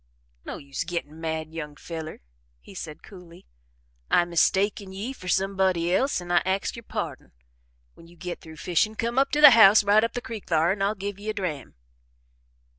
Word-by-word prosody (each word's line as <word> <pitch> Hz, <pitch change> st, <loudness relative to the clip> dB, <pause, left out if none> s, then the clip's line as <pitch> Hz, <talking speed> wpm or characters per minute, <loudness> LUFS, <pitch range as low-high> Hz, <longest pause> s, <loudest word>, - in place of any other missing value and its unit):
"No -, -, -6 dB
use 140 Hz, +1 st, -5 dB
gittin' 165 Hz, -2 st, -6 dB
mad, 160 Hz, -1 st, -4 dB
young 150 Hz, -3 st, -6 dB
feller," 160 Hz, 0 st, -8 dB, 0.4 s
he -, -, -15 dB
said 160 Hz, -5 st, -8 dB
coolly. 180 Hz, -4 st, -14 dB, 0.6 s
"I 175 Hz, -, +4 dB
mistaken 190 Hz, +3 st, +1 dB
ye 205 Hz, +7 st, -5 dB
fer 185 Hz, -8 st, -12 dB
somebody 190 Hz, -2 st, +1 dB
else 265 Hz, +6 st, +1 dB
an' 175 Hz, 0 st, -7 dB
I 175 Hz, -, +4 dB
axe 190 Hz, +2 st, -1 dB
yer 235 Hz, -, -8 dB
pardon. 190 Hz, -11 st, -6 dB, 0.6 s
When 165 Hz, -, -17 dB
you 170 Hz, -, -18 dB
git 180 Hz, 0 st, -6 dB
through 160 Hz, -1 st, -12 dB
fishin' 180 Hz, +7 st, 0 dB
come 235 Hz, +3 st, -1 dB
up 275 Hz, -, +2 dB
to 300 Hz, -, +2 dB
the 300 Hz, -, +11 dB
house 215 Hz, -2 st, +7 dB
right 205 Hz, +2 st, +4 dB
up 230 Hz, -, -1 dB
the -, -, -2 dB
creek 225 Hz, -3 st, -8 dB
thar 165 Hz, +1 st, +2 dB
an' 195 Hz, 0 st, -3 dB
I'll 200 Hz, +2 st, +1 dB
give 200 Hz, 0 st, -6 dB
ye 210 Hz, +1 st, -6 dB
a 215 Hz, -, -2 dB
dram." 175 Hz, -9 st, -5 dB
185 Hz, 190 wpm, -25 LUFS, 165-205 Hz, 0.6 s, the